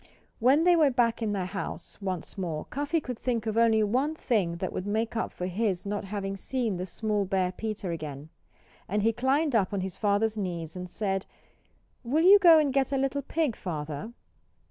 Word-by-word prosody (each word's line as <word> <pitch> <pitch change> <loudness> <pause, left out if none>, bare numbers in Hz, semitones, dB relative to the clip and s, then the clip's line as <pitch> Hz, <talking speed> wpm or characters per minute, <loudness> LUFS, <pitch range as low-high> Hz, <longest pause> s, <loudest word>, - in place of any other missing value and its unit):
When 265 +7 +4
they 355 0 +6
were 310 -4 +5
back 240 -3 +1
in 220 -2 0
their 195 -3 -1
house 195 +2 -5
once 185 -4 -4
more 170 -6 -3
Cuffy 290 +4 -1
could 250 -5 -6
think 235 -3 -1
of 220 -1 -2
only 225 -1 +4
one 260 +9 0
thing 205 - 0
that 180 +2 -4
would 185 - -4
make 220 +3 -1
up 225 - -1
for 180 - -5
his 190 0 -1
not 205 0 -3
having 195 0 -4
seen 225 -1 -2
the 180 +1 -4
small 210 +2 -1
bear 185 -1 0
Peter 215 -2 -4
again. 150 -2 -6 0.6
And 205 +2 0
he 225 +1 +3
climbed 270 +5 +1
up 200 -5 +2
on 200 - -1
his 190 -1 -5
father's 215 +1 +1
knees 170 -4 -4
and 180 0 -6
said 195 -1 -2 0.8
"Will 290 +7 +1
you 400 +3 +8
go 340 -4 +8
and 295 -4 +2
get 270 -1 +1
a 275 - +1
little 275 +1 0
pig, 290 -3 -1
Father?" 155 +3 -5
215 Hz, 200 wpm, -28 LUFS, 185-255 Hz, 0.8 s, you